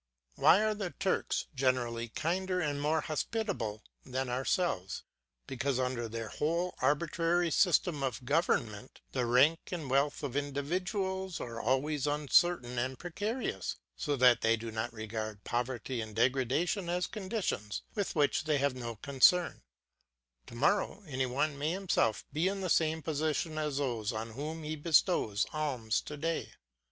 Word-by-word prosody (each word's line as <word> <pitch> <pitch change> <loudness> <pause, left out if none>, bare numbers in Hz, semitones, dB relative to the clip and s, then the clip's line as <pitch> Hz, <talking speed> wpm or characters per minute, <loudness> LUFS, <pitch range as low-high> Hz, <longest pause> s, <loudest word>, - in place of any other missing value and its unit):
Why 195 - +5
are 215 0 +2
the 200 -3 -3
Turks 195 +1 -1
generally 125 -3 0
kinder 180 +7 -1
and 145 -4 -1
more 155 +2 +2
hospitable 155 - -2 0.2
than 130 0 -3
ourselves? 125 - -1 0.4
Because, 135 0 -1
under 125 -3 -1
their 115 -1 -5
wholly 170 +4 0
arbitrary 165 +4 +2
system 170 -4 +3
of 130 -2 -2
government, 125 -6 0
the 125 -2 0
rank 140 +7 +5
and 160 -7 -4
wealth 140 +2 +2
of 135 -3 -3
individuals 180 +6 -2
are 115 -1 -5
always 135 +4 +1
uncertain 145 -3 +2
and 130 +2 -2
precarious, 205 +8 -3 0.2
so 145 -3 -1
that 125 -2 +5
they 115 0 +4
do 115 +1 -6
not 110 0 -2
regard 110 -1 -5
poverty 120 0 -2
and 110 -1 -7
degradation 135 - +1
as 175 0 +1
conditions 190 - -3
with 205 -4 -2
which 150 0 +2
they 155 -2 +2
have 140 -1 +1
no 120 -2 -5
concern; 140 - +3 0.9
to - - -10
morrow, 200 - +1
any 130 -4 -1
one 140 +3 -1
may 155 +3 0
himself 175 - +1
be 160 +5 +2
in 195 0 -1
the 185 -3 -1
same 160 -1 +2
position 155 +1 -1
as 150 -2 -1
those 120 -6 -1
on 110 0 -4
whom 155 +6 -5
he 155 +1 -3
bestows 150 - +2
alms 130 -8 0
to 150 - -7
day. 165 +2 -2
145 Hz, 150 wpm, -32 LUFS, 125-170 Hz, 0.9 s, Why